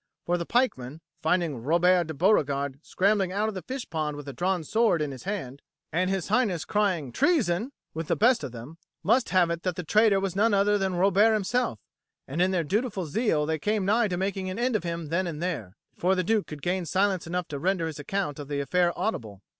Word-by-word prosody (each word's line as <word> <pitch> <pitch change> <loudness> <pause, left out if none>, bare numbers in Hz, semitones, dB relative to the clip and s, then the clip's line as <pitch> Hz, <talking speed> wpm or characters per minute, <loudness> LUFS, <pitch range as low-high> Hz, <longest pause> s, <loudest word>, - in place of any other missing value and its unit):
For 175 - +1
the 170 - -4
pikemen, 155 - 0 0.2
finding 160 -6 0
Robert 175 +5 +3
de 160 - -5
Beauregard 140 -6 +1
scrambling 195 +1 +1
out 210 +3 0
of - - -5
the 185 - -5
fish 260 +3 -6
pond 155 -2 -3
with 145 -1 -9
a 140 - -5
drawn 180 +1 -1
sword 220 +1 +2
in 150 -2 -2
his 130 +3 -10
hand, 140 -10 -4 0.3
and 180 +3 +1
His 190 -2 -2
Highness 205 -7 +1
crying 185 -10 0
"Treason!" 230 - +1 0.2
with 160 0 -4
the - - +1
best 240 -4 +3
of 135 - -4
them, 125 +8 -10 0.2
must 235 +5 +3
have 180 -3 +3
it 170 0 -3
that 180 -1 -2
the 180 - -4
traitor 210 +3 +4
was 195 -2 -3
none 210 +1 +3
other 205 +1 +3
than 190 -2 -1
Robert 200 +4 +4
himself, 215 - 0 0.5
and 150 +6 -2
in 185 - +4
their 180 -3 0
dutiful 195 - -1
zeal 160 -3 +1
they 160 0 -1
came 210 +2 0
nigh 220 +3 +3
to 180 -3 -2
making 190 0 -2
an 185 - -5
end 245 0 0
of 215 - 0
him 170 -3 -4
then 180 +3 0
and 155 -3 -5
there, 150 - -4 0.2
before 185 +2 +1
the 185 - 0
Duke 215 +2 +1
could 150 -2 -9
gain 180 -1 -1
silence 190 -2 +1
enough 180 0 -2
to 145 - -4
render 185 +1 0
his 160 -2 -5
account 150 -1 -3
of 145 - -7
the 145 -1 -2
affair 175 +4 +1
audible. 105 - -3
180 Hz, 225 wpm, -27 LUFS, 155-205 Hz, 0.5 s, traitor